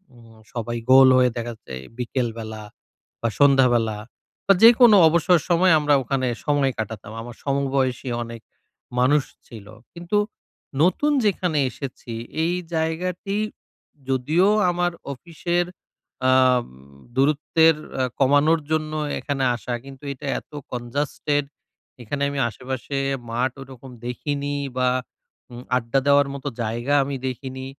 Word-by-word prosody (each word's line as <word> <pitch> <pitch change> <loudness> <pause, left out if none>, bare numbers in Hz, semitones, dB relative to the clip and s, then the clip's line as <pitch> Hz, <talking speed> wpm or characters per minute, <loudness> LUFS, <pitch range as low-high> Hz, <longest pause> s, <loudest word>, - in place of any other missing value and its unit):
উ - - -18 0.4
সবাই 120 0 -3
গোল 135 0 +9
হয়ে 125 -1 +4
দেখা 120 0 -3
যাচ্ছে 110 - -10 0.2
বিকেলবেলা 115 -3 -3 0.6
বা 115 - 0
সন্ধ্যাবেলা 125 -6 +4 0.5
বা 195 - +7
যেকোনো 230 -2 +8
অবসর 170 +2 +3
সময় 175 +1 +4
আমরা 150 -1 +2
ওখানে 130 +1 -1 0.2
সময় 145 -3 +2
কাটাতাম। 110 -1 -5
আমার 120 0 -9
সমবয়সী 135 -2 -1
অনেক 115 -1 -9 0.6
মানুষ 140 +3 +4 0.2
ছিল। 110 -4 -11 0.3
কিন্তু 175 +4 -2 0.7
নতুন 185 - +2
যেখানে 180 -6 +1
এসেছি 130 -4 -8 0.3
এই 175 - 0 0.2
জায়গাটি 175 +5 -2 0.7
যদিও 150 +8 +2 0.2
আমার 175 0 0 0.2
অফিসের 175 +4 -2 0.7
আম 130 -1 +4 0.5
দূরত্বের 150 +3 +3 0.3
আ - - +2 0.2
কমানোর 145 +4 +4
জন্য 155 -1 -1 0.3
এখানে 140 -2 -2
আসা 120 +1 -5
কিন্তু 135 0 -12
এটা 130 - -11
এত - - -26 0.2
কনজাস্টেড 145 +4 -2 0.6
এখানে 140 +5 -4
আমি 140 -1 -3
আশেপাশে 130 +3 -5 0.3
মাঠ 125 +2 0
ওরকম 130 -1 -11
দেখিনি 145 +3 -3 0.2
বা 125 0 +3 0.6
উম 120 +1 -9
আড্ডা 120 +2 0
দেওয়ার 140 0 +5
মতো 140 -1 -6 0.2
জায়গা 120 +5 -2
আমি 140 0 -4
দেখিনি। 130 +1 -6
135 Hz, 120 wpm, -23 LUFS, 125-155 Hz, 0.7 s, গোল